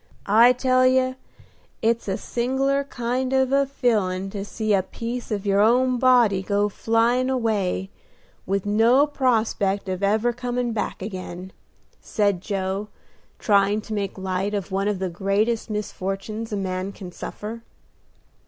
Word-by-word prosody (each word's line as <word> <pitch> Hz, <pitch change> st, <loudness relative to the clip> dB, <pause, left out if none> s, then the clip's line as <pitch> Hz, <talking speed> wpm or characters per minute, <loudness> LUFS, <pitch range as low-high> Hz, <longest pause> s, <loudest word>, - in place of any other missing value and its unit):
I 230 Hz, +4 st, +6 dB
tell 255 Hz, 0 st, +3 dB
you, 255 Hz, 0 st, +2 dB, 0.7 s
it's 230 Hz, 0 st, +1 dB
a 195 Hz, -, -1 dB
sing'lar 270 Hz, +3 st, 0 dB
kind 255 Hz, 0 st, -2 dB
of 265 Hz, -1 st, +2 dB
a 275 Hz, 0 st, +3 dB
feelin' 195 Hz, -8 st, 0 dB
to 200 Hz, -1 st, -4 dB
see 215 Hz, +1 st, -2 dB
a 195 Hz, -, +4 dB
piece 235 Hz, +6 st, -6 dB
of 210 Hz, -2 st, -3 dB
your 200 Hz, 0 st, +2 dB
own 250 Hz, +3 st, +3 dB
body 240 Hz, -7 st, +4 dB
go 205 Hz, +1 st, 0 dB
flyin' 230 Hz, +5 st, +1 dB
away, 210 Hz, -6 st, -1 dB, 0.6 s
with 195 Hz, +1 st, -1 dB
no 230 Hz, +7 st, +4 dB
prospect 220 Hz, -8 st, 0 dB
of 185 Hz, 0 st, -3 dB
ever 215 Hz, +4 st, +2 dB
coming 245 Hz, -1 st, -2 dB
back 210 Hz, -3 st, -3 dB
again," 185 Hz, -2 st, -7 dB, 0.5 s
said 200 Hz, -4 st, 0 dB
Joe, 195 Hz, +1 st, -3 dB, 0.5 s
trying 200 Hz, 0 st, +3 dB
to 215 Hz, -, -7 dB
make 200 Hz, -2 st, -3 dB
light 190 Hz, +2 st, -2 dB
of 200 Hz, -1 st, -4 dB
one 195 Hz, +1 st, 0 dB
of 210 Hz, -2 st, 0 dB
the 190 Hz, 0 st, -2 dB
greatest 200 Hz, +6 st, 0 dB
misfortunes 210 Hz, +1 st, -4 dB
a 205 Hz, -, -1 dB
man 185 Hz, 0 st, -3 dB
can 185 Hz, -3 st, -9 dB
suffer. 215 Hz, +5 st, -7 dB
215 Hz, 145 wpm, -23 LUFS, 195-245 Hz, 0.7 s, I